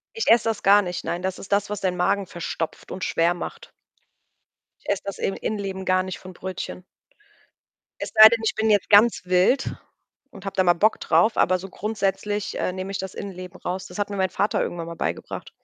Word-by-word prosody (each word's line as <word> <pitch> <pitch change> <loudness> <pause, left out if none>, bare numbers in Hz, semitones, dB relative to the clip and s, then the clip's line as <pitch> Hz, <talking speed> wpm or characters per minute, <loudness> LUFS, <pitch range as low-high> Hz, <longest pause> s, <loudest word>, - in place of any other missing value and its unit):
Ich 450 - -2
esse 230 0 +6
das 220 - -3
gar 205 +1 +6
nicht. 180 -1 -4
Nein, 175 +1 -3
das 190 0 -3
ist - - -11
das, 205 0 +1
was 210 - -4
deinen 180 -2 -1
Magen 190 +2 +1
verstopft 165 -1 -5
und 185 - -5
schwer 170 +1 +2
macht. 175 - -8 1.1
Ich - - -10
esse 200 - 0
das 200 - -5
In 195 - -1
Innenleben 195 -3 -4
gar 185 0 +3
nicht 185 -2 -5
von 185 0 -11
Brötchen. 185 0 -6 1.2
Es - - -4
sei 215 0 +12
denn, 230 0 0
ich 220 - 0
bin 220 0 +1
jetzt 205 -3 +2
ganz 215 +3 +6
wild 185 +9 +2 0.6
und 195 -1 -13
habe 195 0 -5
da 185 - +3
mal 175 -1 +5
Bock 210 +6 +2
drauf, 220 +1 +2
aber 185 +1 +3
so 195 +2 -8
grundsätzlich, 205 0 -2
äh, 180 - -1
nehme 185 +1 -5
ich 195 - -2
das 190 -1 -6
Innenleben 185 -2 -8
raus. 185 +2 -4
Das - - -9
hat 205 - -1
mir 200 - -5
mein 190 -1 +1
Vater 200 +3 0
irgendwann 170 -1 -4
mal 170 - -7
beigebracht. - - -4
190 Hz, 215 wpm, -24 LUFS, 185-205 Hz, 1.2 s, sei